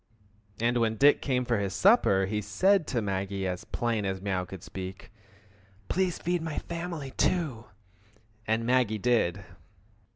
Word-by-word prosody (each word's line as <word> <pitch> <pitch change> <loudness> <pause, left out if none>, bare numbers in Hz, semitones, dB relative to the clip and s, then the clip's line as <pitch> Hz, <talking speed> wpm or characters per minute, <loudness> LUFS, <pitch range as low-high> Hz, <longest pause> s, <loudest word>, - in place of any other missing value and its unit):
And 120 +2 +1
when 110 -1 +1
Dick 145 +5 +5
came 125 -2 0
for 120 -3 +1
his 95 -1 -2
supper 185 - +4
he 105 +2 -2
said 170 - +2
to 120 -4 -1
Maggie 95 0 -2
as 90 -1 -3
plain 115 -3 -1
as 95 -1 -2
mew 95 -2 -2
could 95 0 -9
speak, 95 0 -8 0.8
"Please 185 -2 0
feed 175 0 -1
my 160 -2 -4
family, 170 -5 -5
too!" 140 -12 0 0.8
and 110 +1 +1
Maggie 120 -3 +2
did. 100 -5 +1
115 Hz, 150 wpm, -28 LUFS, 95-145 Hz, 0.8 s, Dick